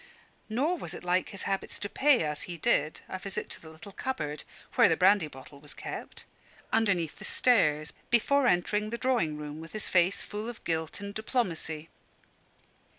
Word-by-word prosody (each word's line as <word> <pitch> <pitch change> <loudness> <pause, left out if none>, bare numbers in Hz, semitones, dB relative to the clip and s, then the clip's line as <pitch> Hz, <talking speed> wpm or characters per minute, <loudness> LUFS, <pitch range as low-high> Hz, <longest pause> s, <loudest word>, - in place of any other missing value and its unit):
Nor 295 +11 +1
was - - -5
it - - -9
like 180 +1 +1
his 195 - -8
habits 195 -1 -2
to 205 - -3
pay, 275 - +4
as 150 -1 -2
he 175 - -5
did, 155 0 +1
a 185 - -5
visit 195 +1 -4
to - - -6
the 160 - -11
little 160 +6 -11
cupboard 155 - -3 0.3
(where - - +6
the 165 - +3
brandy 190 -2 +5
bottle 140 0 -12
was 150 0 -9
kept) - - -7 0.5
underneath 195 -8 +2
the - - -9
stairs, 155 -11 +3 0.2
before 265 +3 +4
entering 210 +2 +2
the 235 - -3
drawing 235 -13 +1
room, 150 +1 -6
with 165 - -10
his 215 - -4
face 180 +2 +3
full 210 +2 -5
of 240 - -9
guilt 160 +3 -2
and 200 0 -5
diplomacy. 175 - -1
185 Hz, 180 wpm, -30 LUFS, 160-220 Hz, 0.5 s, where